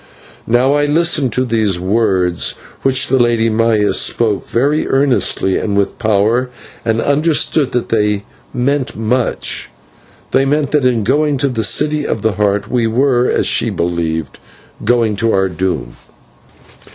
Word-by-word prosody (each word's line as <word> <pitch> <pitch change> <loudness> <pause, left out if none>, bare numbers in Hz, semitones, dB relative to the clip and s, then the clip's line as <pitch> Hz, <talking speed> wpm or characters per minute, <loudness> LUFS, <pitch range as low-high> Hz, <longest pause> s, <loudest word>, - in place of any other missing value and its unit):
Now 125 +4 +2
I 145 0 +2
listened 150 -3 +2
to 130 - 0
these 110 -6 0
words 95 -3 0 0.3
which 130 -1 +2
the 130 +1 +2
Lady 115 -1 +2
Maya 110 -2 +1
spoke 110 -4 0
very 145 +6 0
earnestly 135 -8 +1
and 100 -2 -2
with 100 - -1
power, 110 +3 +1 0.3
and 115 0 0
understood 145 +1 +1
that 125 - -2
they 105 -2 0 0.3
meant 130 +2 -1
much; 115 +3 -2 0.6
they 135 - +3
meant 140 0 0
that 150 -3 +1
in 120 -4 0
going 145 +5 +1
to 140 +1 0
the 115 -3 -2
City 150 +7 +1
of 110 - -3
the 110 - +2
Heart 100 0 -1
we 120 -2 0
were, 125 +1 +1
as - - 0
she - - +1
believed, 85 -2 -3 0.4
going 115 -3 +1
to 115 +1 0
our 95 0 +1
doom. 90 -8 -3
115 Hz, 150 wpm, -15 LUFS, 105-135 Hz, 0.6 s, they